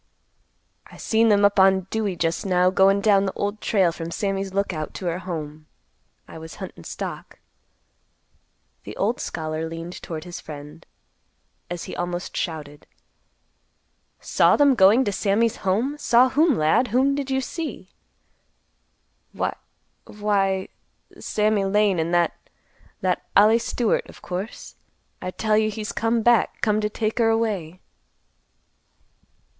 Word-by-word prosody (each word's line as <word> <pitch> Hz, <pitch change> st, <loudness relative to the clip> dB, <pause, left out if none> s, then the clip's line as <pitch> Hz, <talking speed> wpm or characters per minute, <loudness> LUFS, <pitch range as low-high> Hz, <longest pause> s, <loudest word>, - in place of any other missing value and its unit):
"I -, -, -15 dB
seen 225 Hz, 0 st, +2 dB
them 205 Hz, -1 st, +4 dB
up 200 Hz, 0 st, +3 dB
on 190 Hz, 0 st, +5 dB
Dewey 210 Hz, -4 st, -1 dB
just 165 Hz, -1 st, -1 dB
now, 180 Hz, -1 st, +2 dB
goin' 195 Hz, +1 st, +4 dB
down 200 Hz, -2 st, +3 dB
the 190 Hz, -, -3 dB
Old 205 Hz, +1 st, -3 dB
Trail 190 Hz, -5 st, +2 dB
from 165 Hz, 0 st, -6 dB
Sammy's 195 Hz, +1 st, -2 dB
Lookout 185 Hz, -5 st, -3 dB
to 185 Hz, -, -6 dB
her 175 Hz, 0 st, -1 dB
home. 155 Hz, -4 st, -7 dB, 0.6 s
I -, -, -10 dB
was 160 Hz, 0 st, -10 dB
huntin' -, -, -9 dB
stock." -, -, -7 dB, 1.5 s
The -, -, -9 dB
old -, -, 0 dB
scholar 155 Hz, 0 st, -4 dB
leaned 165 Hz, +2 st, -7 dB
toward 160 Hz, -2 st, -6 dB
his 175 Hz, -1 st, -8 dB
friend, 150 Hz, +1 st, -11 dB, 0.8 s
as 175 Hz, -1 st, -5 dB
he -, -, -7 dB
almost 175 Hz, +1 st, -4 dB
shouted, 150 Hz, -4 st, -5 dB, 1.3 s
"Saw -, -, +3 dB
them 285 Hz, -2 st, +5 dB
going 215 Hz, +3 st, +5 dB
to 205 Hz, -, 0 dB
Sammy's 210 Hz, +3 st, +1 dB
home! 230 Hz, +10 st, -1 dB
Saw 250 Hz, -1 st, +4 dB
whom, 300 Hz, +2 st, +3 dB
lad? 155 Hz, +11 st, +3 dB
Whom 260 Hz, +5 st, +2 dB
did 280 Hz, -1 st, -3 dB
you 265 Hz, 0 st, +1 dB
see?" 265 Hz, -, -6 dB, 1.4 s
"Why—why—Sammy 205 Hz, +1 st, -3 dB
Lane 200 Hz, -2 st, +2 dB
and 160 Hz, +1 st, -1 dB
that—that 175 Hz, -1 st, -3 dB
Ollie 220 Hz, +3 st, +6 dB
Stewart, 235 Hz, -1 st, -1 dB
of -, -, -15 dB
course. 190 Hz, +5 st, -6 dB, 0.4 s
I 185 Hz, -, -4 dB
tell 215 Hz, +3 st, +1 dB
you 215 Hz, 0 st, +1 dB
he's 215 Hz, 0 st, -5 dB
come 225 Hz, 0 st, 0 dB
back. 240 Hz, -1 st, +3 dB
Come 215 Hz, -1 st, +2 dB
to 210 Hz, -, -1 dB
take 215 Hz, +2 st, -2 dB
her 225 Hz, -1 st, +4 dB
away." 200 Hz, -7 st, -1 dB
195 Hz, 135 wpm, -23 LUFS, 175-220 Hz, 1.5 s, Ollie